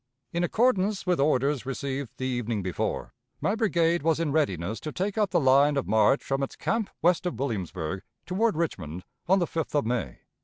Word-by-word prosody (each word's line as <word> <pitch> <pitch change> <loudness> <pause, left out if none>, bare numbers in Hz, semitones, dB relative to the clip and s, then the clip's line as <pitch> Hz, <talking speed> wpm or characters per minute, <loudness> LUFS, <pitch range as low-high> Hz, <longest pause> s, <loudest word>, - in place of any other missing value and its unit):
"In 170 +1 0
accordance 210 0 +2
with 180 -4 +1
orders 140 -1 +2
received 135 -1 -3
the 130 - -3
evening 120 -5 -1
before, 90 -2 -3 0.3
my 200 - +1
brigade 175 -7 +2
was 160 +1 +2
in 165 -3 0
readiness 100 - 0
to 155 - -5
take 195 +6 -2
up 210 -3 +2
the 175 - +2
line 140 +1 +4
of 135 - -1
march 110 +5 +3
from 135 0 -1
its 135 - -3
camp 225 -2 -1
west 175 +1 +3
of 175 - -3
Williamsburg 95 - -3 0.2
toward 200 0 +1
Richmond 90 - -3 0.2
on 190 +2 +5
the 175 - +2
5th 160 -2 -3
of 145 - +2
May. 115 - -2
145 Hz, 190 wpm, -27 LUFS, 120-175 Hz, 0.3 s, on